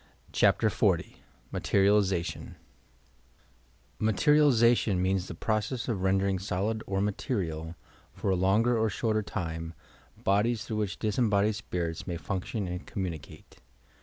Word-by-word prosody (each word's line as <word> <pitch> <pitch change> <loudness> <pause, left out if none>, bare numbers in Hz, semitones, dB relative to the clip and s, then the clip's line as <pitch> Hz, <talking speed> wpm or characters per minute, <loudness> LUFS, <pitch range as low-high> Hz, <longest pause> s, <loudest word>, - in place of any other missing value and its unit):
CHAPTER - - +3
XL - - +3 0.6
MATERIALIZATION 100 -3 +1 1.4
Materialization 115 -2 +4
means 95 0 0
the 90 - -7
process 110 +6 -1
of 115 -6 -1
rendenDg 95 0 +1
solid 105 +3 -1
or 95 0 0
material, 90 - -2 0.4
for 95 - -2
a - - +3
longer 105 +7 +3
or 110 -1 +2
shorter 110 +1 0
time, 80 -5 -5 0.5
bodies 105 +3 +1
through 110 - -3
which 105 -4 -2
disembodied 105 -1 +1
spirits 85 -5 -4
may 85 - -3
function 95 +3 -3
and 90 +1 -6
communi 90 -6 -3
cate. - - -15
100 Hz, 120 wpm, -29 LUFS, 90-110 Hz, 1.4 s, Materialization